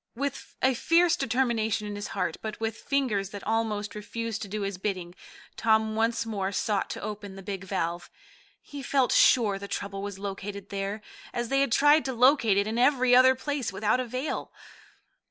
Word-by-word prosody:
With 275 +2 -4
a 260 0 +4
fierce 335 +6 +3
determination 230 -6 0
in 205 0 -5
his 205 - -5
heart, 180 -4 -2
but 215 -1 -5
with 225 -1 -2
fingers 230 -8 -1
that 200 -1 -8
almost 215 -2 -1
refused 220 +1 -5
to 205 - -5
do 210 +2 -4
his 195 -2 -4
bidding, 185 -3 -3 0.4
Tom 220 -1 +2
once 230 +1 +1
more 200 -3 -2
sought 205 +1 -1
to - - -5
open 205 -2 -6
the 195 - -10
big 195 0 -5
valve. 175 -2 -3 0.5
He 285 -1 -8
felt 265 -1 +1
sure 210 -6 +4
the 200 - -7
trouble 195 0 -4
was 200 -1 -5
located 200 0 -6
there, 200 +2 -4 0.3
as 240 -1 -2
they 275 0 +2
had 275 - +1
tried 295 +5 +5
to 265 - -2
locate 240 -4 +4
it 200 - +3
in 220 +2 -2
every 255 -1 +4
other 260 +1 +7
place 280 -1 -3
without 205 +5 +1
avail. 255 +4 -3
220 Hz, 185 wpm, -27 LUFS, 200-255 Hz, 0.5 s, other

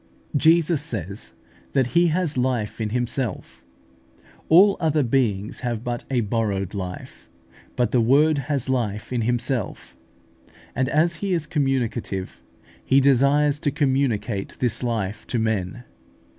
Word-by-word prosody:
Jesus 160 +1 +3
says 100 - -6 0.4
that 130 -3 +1
He 175 +1 +5
has 165 -1 0
life 125 -4 -1
in 110 - -1
Himself; 120 - -3 0.9
all 195 +5 +7
other 155 -3 +2
beings 115 -5 0
have 120 -3 -3
but 120 -1 -4
a 130 -3 +1
borrowed 100 -3 -1
life, 90 -3 -7 0.5
but 120 -3 +1
the 125 - +3
Word 145 +6 +4
has 140 -4 0
life 115 -3 -2
in 120 - 0
Himself; 120 0 -2 0.8
and 130 +1 0
as 160 +3 +2
He 195 +2 -2
is 165 -3 -1
communicative, 130 - -2 0.4
He 135 - +4
desires 140 +2 +3
to 145 - 0
communicate 130 -8 -1
this 120 -2 0
life 110 -4 -3
to 120 - -1
men. 110 0 -2
125 Hz, 130 wpm, -23 LUFS, 110-145 Hz, 0.9 s, all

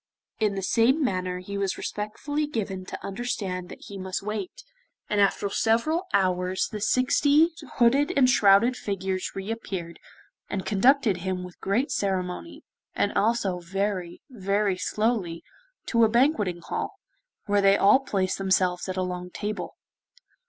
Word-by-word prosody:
In 210 -2 +1
the 195 - -3
same 245 - +3
manner 185 -6 -1
he 200 +2 -5
was 195 -1 -1
respectfully 290 +9 -3
given 195 -8 -4
to - - -7
understand 195 -4 -3
that - - -11
he 200 -1 -8
must 190 +1 -4
wait, 210 -2 -5 0.5
and 205 -1 +3
after 200 0 +2
several 235 - +1
hours 185 -1 +1
the 215 -2 -6
sixty 285 - +3 0.3
hooded 275 +7 +4
and 260 -2 +6
shrouded 230 0 +5
figures 190 -4 -3
re 195 +2 -4
appeared, 185 -7 -5 0.5
and 195 -2 -3
conducted 225 0 +3
him 180 0 -3
with 180 -1 -11
great 225 +9 0
ceremony, 190 - -3 0.3
and 205 - +1
also 205 -4 +1
very 185 0 -3
very 200 -4 0
slowly, 195 -3 -1 0.4
to 230 -1 +3
a 220 - +5
banqueting 220 - +2
hall, - - -4 0.5
where 205 -1 +2
they 195 0 +5
all 205 +6 +6
placed 195 -9 -1
themselves 190 -1 +1
at 185 - -3
a 185 - +1
long 180 0 -4
table. 210 +3 -5
200 Hz, 145 wpm, -26 LUFS, 185-230 Hz, 0.5 s, and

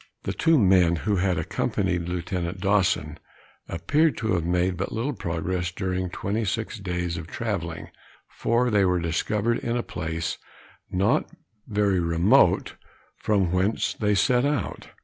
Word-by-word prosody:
The - - -2
two 165 -1 +3
men 90 -6 +4
who 100 +5 0
had 90 -1 +1
accompanied 90 -3 -1
Lieutenant 90 +1 -3
Dawson, 95 -6 +1 0.5
appeared 140 - +1
to 110 -2 -1
have 85 -3 +1
made 90 +2 +1
but 100 +3 -3
little 120 +6 -2
progress 85 +1 -2
during 90 -1 -2
twenty 105 +5 -2
six 110 +1 -3
days 90 -3 -3
of 80 0 -6
travelling, 85 -6 -4 0.4
for 120 +1 0
they 105 -2 +4
were 90 -1 +2
discovered 105 +7 0
in 120 0 -2
a 120 - -1
place 80 +1 -4 0.5
not 100 +6 +1 0.4
very 105 -3 +1
remote 85 +3 +3 0.4
from 100 -5 +1
whence 95 +4 +1
they 105 -1 +1
set 125 +4 +3
out. 145 - -2
95 Hz, 145 wpm, -25 LUFS, 85-110 Hz, 0.5 s, men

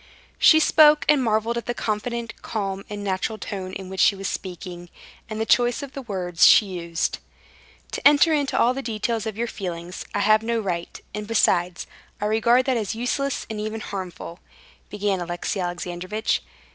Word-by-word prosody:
She 315 - +7
spoke, 305 -1 +5
and 290 -3 +4
marveled 225 +1 +1
at - - -12
the 240 - -2
confident, 230 +2 -3
calm, 195 -3 -3
and 205 -1 -5
natural 195 +3 -2
tone 190 -3 -6
in 190 -1 -6
which 190 0 -7
she 200 - +5
was 195 0 -4
speaking, 175 -2 -6 0.4
and 215 0 -5
the 220 - 0
choice 245 +4 +2
of 280 - -7
the 275 - -6
words 185 -7 -2
she 215 - +7
used. 170 -3 -3 0.7
"To - - +4
enter 295 +3 +5
into 285 -2 0
all 245 - +4
the 270 - -4
details 225 -2 -2
of 215 -1 -5
your 235 - 0
feelings 180 -5 -6
I 205 - +1
have 215 +1 +4
no 230 +1 -1
right, 175 -5 -4
and 210 0 -5
besides, 180 -5 +1 0.3
I 210 - -2
regard 235 +4 +3
that 260 -3 +1
as 215 -1 -2
useless 270 +4 -2
and 220 -1 -5
even 215 +1 -4
harmful," 185 -3 -7 0.5
began 205 -2 -1
Alexey 175 +3 -3
Alexandrovitch. 180 +4 -2
210 Hz, 180 wpm, -23 LUFS, 185-235 Hz, 0.7 s, She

